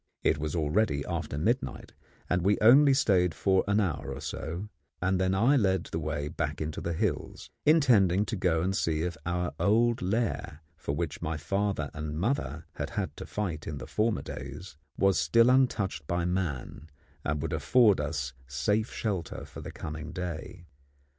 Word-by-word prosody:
It - - +2
was 75 +2 -2
already 75 -1 +1
after 70 - -3
midnight, 120 - -1 0.3
and 90 0 +1
we 100 +4 +3
only 135 +6 +7
stayed 90 - +3
for 95 +1 +2
an 100 +1 +3
hour 90 -8 -1
or - - -7
so, 85 +6 -5 0.3
and 95 +1 +1
then 95 0 +2
I 120 +9 +4
led 95 -8 +2
the 80 - -1
way 75 -2 -2
back 75 -2 -3
into 80 0 -4
the 85 - -2
hills, 80 - -3 0.2
intending 105 - +5
to 110 - -3
go 90 -5 +1
and 95 +2 0
see 80 -4 0
if 85 -1 -2
our 90 0 -1
old 115 +3 +3
lair, 95 -5 -2
for 70 - -4
which 80 -2 -3
my 80 -1 -2
father 95 -1 -1
and 75 0 -4
mother 85 - -1
had - - -3
had - - -3
to - - -7
fight 85 -7 -3
in 75 - -4
the - - -7
former 110 0 0
days, 70 +7 -8 0.2
was 95 -4 +3
still 115 +6 +5
untouched 100 - +1
by 85 0 0
man 80 -5 -3 0.3
and 75 -1 -1
would - - -2
afford 115 -8 +4
us 75 -4 -3
safe 85 - 0
shelter 95 -8 -3
for - - -10
the - - -7
coming 80 +1 -6
day. 90 -1 -6
90 Hz, 175 wpm, -29 LUFS, 75-105 Hz, 0.3 s, only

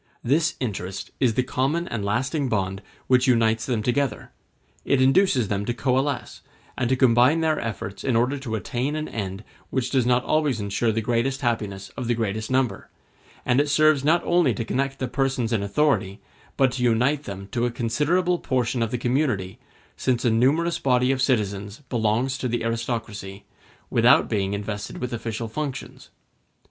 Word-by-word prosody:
This 155 +5 +2
interest 95 -6 -4
is 120 -5 +2
the 125 - +2
common 140 +7 -1
and 115 -3 -3
lasting 130 +7 -1
bond 95 -2 -1 0.2
which 130 +1 +3
unites 115 -2 +2
them 115 -5 -1
together; 125 -1 -1 0.5
it 140 - +2
induces 130 - +3
them 100 0 -1
to 120 - -2
coalesce, 135 +1 -1 0.3
and 120 -2 -1
to 130 - +3
combine 130 +5 +4
their 160 -1 +1
efforts 100 -3 -5
in 130 - +1
order 125 +5 +1
to 120 -5 -4
attain 125 +8 -2
an 155 0 -3
end 100 -1 -5 0.3
which 130 +2 -2
does 130 -3 +2
not 125 0 +3
always 150 -6 +1
ensure 100 +3 0
the 110 +1 -1
greatest 125 +4 0
happiness 105 -6 -2
of 125 - -6
the 120 - +1
greatest 110 -1 -2
number; 130 -6 0 0.6
and 130 +2 +3
it 145 - -1
serves 155 -1 +4
not 165 +4 +3
only 170 -9 +3
to 115 - -3
connect 135 +3 -1
the 130 - -2
persons 130 -4 -1
in 110 - +1
authority, 100 -2 0 0.4
but 135 -2 +4
to 125 - -4
unite 125 +5 +2
them 100 0 -7
to 120 0 0
a - - -1
considerable 150 +10 0
portion 125 -2 -1
of 115 - 0
the 125 - -2
community, 120 -7 -1 0.4
since 125 -1 0
a 120 - +4
numerous 145 +9 +2
body 125 -1 +2
of 135 -1 -1
citizens 105 -4 -1
belongs 120 +3 0
to 125 - -1
the 120 -1 -2
aristocracy, 115 -4 -4 0.5
without - - +5
being 100 -2 -1
invested 105 0 -5
with 125 -1 -4
official 115 0 -4
functions. 140 +3 -6
120 Hz, 175 wpm, -24 LUFS, 110-135 Hz, 0.6 s, without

